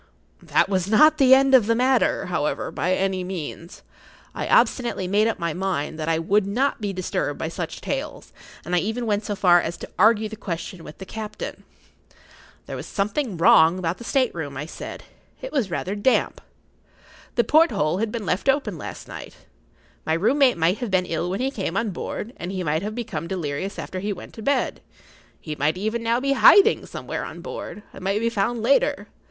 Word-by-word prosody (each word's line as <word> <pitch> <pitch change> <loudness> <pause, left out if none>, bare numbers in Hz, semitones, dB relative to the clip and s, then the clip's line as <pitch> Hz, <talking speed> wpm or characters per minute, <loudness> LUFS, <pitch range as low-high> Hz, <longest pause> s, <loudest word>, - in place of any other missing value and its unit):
That - - +2
was 190 -2 0
not 305 +9 +5
the 265 -1 +8
end 270 0 +3
of 245 -5 +6
the 230 - +3
matter, 255 +1 +2
however, 160 -4 -2
by 180 +2 0
any 190 -1 -1
means. 175 -2 -7 0.5
I - - -4
obstinately 235 -7 +2
made 205 +4 +3
up 225 - -1
my 170 -3 -2
mind 175 -4 -3
that 155 +1 -2
I 165 - +2
would 195 +5 +1
not 250 +5 0
be 205 -1 -2
disturbed 185 -2 -2
by - - -3
such - - -5
tales, - - -5 0.3
and 175 +2 -1
I - - +4
even 225 +6 -2
went 210 -1 0
so 205 - -2
far 175 -3 +5
as 170 - -4
to - - -9
argue 220 0 +4
the 220 - -8
question 175 -3 -6
with 150 - -11
the 190 - -8
captain. 215 +1 -7 1.0
There - - -6
was - - -7
something 210 - -2
wrong 165 +1 +6
about 175 -1 -2
the - - -8
state 255 0 +1
room, 145 -5 -5
I 145 - -4
said. 165 - -8 0.4
It - - -7
was 250 -9 0
rather 180 +2 -3
damp. 210 +6 +1 0.9
The 235 - +3
porthole 215 - +3
had 220 0 -1
been 225 -3 -4
left 185 +9 0
open 250 - 0
last - - -8
night. - - -9 0.7
My 160 - 0
room 215 - +2
mate 260 -7 +5
might 170 +4 +1
have 245 -4 -3
been 185 -1 +2
ill 170 +1 -2
when 195 +5 -2
he 265 +1 0
came 195 -6 -3
on 225 -2 0
board, 210 +5 -5
and 175 +2 -5
he 185 -1 -3
might 155 0 0
have 210 +2 -4
become[Pg 240 -1 -3
34] 160 +1 -3
delirious 175 +1 -4
after 185 - -5
he 205 +2 -2
went 180 - -11
to 225 - -9
bed. 280 +5 0 0.6
He 155 -2 -6
might 150 +4 0
even 220 +4 -2
now 230 +1 +1
be 275 +1 +1
hiding 390 +8 +6
somewhere - - -5
on - - -8
board, 210 - -7
and - - -11
might 195 +2 0
be 230 +1 0
found 225 +2 -1
later. 280 - +2
200 Hz, 205 wpm, -23 LUFS, 175-235 Hz, 1.0 s, the